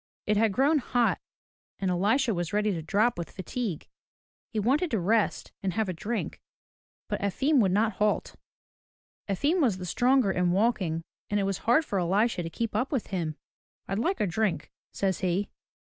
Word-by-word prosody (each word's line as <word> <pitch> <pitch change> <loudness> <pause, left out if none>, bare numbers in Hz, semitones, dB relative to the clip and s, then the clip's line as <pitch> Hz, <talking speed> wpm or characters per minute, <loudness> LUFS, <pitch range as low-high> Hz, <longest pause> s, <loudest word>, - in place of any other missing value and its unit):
It 210 - +2
had 220 +1 +3
grown 280 +9 +3
hot 245 -2 +1 0.6
and 190 -2 -1
Elisha 220 +7 +2
was 175 -1 -3
ready 210 0 +2
to 170 -4 -3
drop 205 +6 +1
with 170 - -4
fatigue. 195 -1 -4 0.6
He 220 - -2
wanted 275 - +2
to 225 - 0
rest 210 +4 +1
and 190 -2 -1
have 220 0 0
a - - -1
drink, 220 +7 -4 0.7
but - - -3
Efim 265 +9 +2
would 195 -5 +3
not 215 +4 +2
halt. 210 0 0 0.9
Efim 290 - +1
was 230 -10 +2
the 180 - -6
stronger 245 +3 +3
in 180 -1 +1
walking 185 -5 +1 0.3
and 205 - +1
it - - +1
was 195 -1 -1
hard 305 +7 +5
for 200 - -1
Elisha 195 +4 +1
to 165 - -4
keep 230 +6 -3
up 260 - 0
with 265 -7 -1
him. 165 -5 -2 0.5
"Fd 195 +2 -1
like 380 +3 0
a - - +2
drink," 175 -4 -1 0.2
says 190 -2 -1
he. 185 +2 -1
205 Hz, 180 wpm, -28 LUFS, 185-240 Hz, 0.9 s, hard